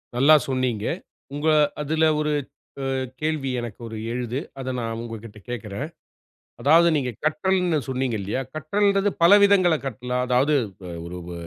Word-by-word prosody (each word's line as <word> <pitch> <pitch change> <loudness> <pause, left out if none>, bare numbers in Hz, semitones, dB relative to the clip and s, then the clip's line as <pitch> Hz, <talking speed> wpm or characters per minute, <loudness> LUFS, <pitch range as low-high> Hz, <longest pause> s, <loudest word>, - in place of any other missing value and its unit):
நல்லா 145 +5 +7
சொன்னீங்க. 125 -5 -1 0.5
உங்க 150 +2 -2 0.3
அதுல 160 +2 0 0.2
ஒரு 150 0 0 0.5
அ - - -1 0.3
கேள்வி 155 -4 -1
எனக்கு 120 -2 -7
ஒரு 110 -1 -7
எழுது. 125 +1 -2 0.2
அத 130 0 -3
நா - - -3 0.2
உங்ககிட்ட 115 -2 -8
கேக்கறேன். 115 +3 -4 0.7
அதாவது 165 +4 +6
நீங்க 130 -3 -1
கற்றல்னு 180 +1 +1
சொன்னீங்க 130 -2 -1
இல்லையா, 105 +7 -2
கற்றல்ன்றது 200 +6 +1
பல 170 +4 +7
விதங்கள்ள 185 -5 +5
கற்கலா. 125 -1 -4
அதாவது 130 +4 +3 0.3
வ - - -7 0.2
ஒரு 90 +1 -7
வ - - -6
135 Hz, 140 wpm, -24 LUFS, 120-160 Hz, 0.7 s, நல்லா